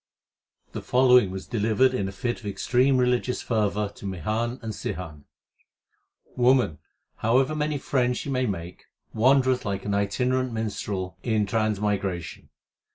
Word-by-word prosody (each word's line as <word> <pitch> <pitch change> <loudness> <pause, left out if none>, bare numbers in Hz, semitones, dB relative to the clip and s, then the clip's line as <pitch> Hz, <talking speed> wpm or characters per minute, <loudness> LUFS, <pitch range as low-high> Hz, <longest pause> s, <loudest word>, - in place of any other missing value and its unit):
The - - -5
following 125 -4 +4
was 95 0 -6
delivered 115 +3 +2
in 100 -6 -1
a - - -5
fit 120 +5 -3
of 105 - -8
extreme 125 +7 +2
religious 125 0 +1
fervour 105 -2 0
to 100 - -7
Mihan 110 - -2
and 110 -1 -4
Sihan: 80 -7 -6 1.1
Woman, 125 - +3 0.4
however 130 +6 +2
many 150 0 -1
friends 125 -2 0
she - - -5
may 130 -1 0
make, 90 -3 -6 0.3
wan 130 +4 +4
dereth 130 -1 0
like 100 -2 -3
an 100 - -1
itinerant 125 +5 0
minstrel 100 -4 -4
in 110 -3 +1
transmigration. 100 -5 -2
110 Hz, 140 wpm, -25 LUFS, 100-125 Hz, 1.1 s, following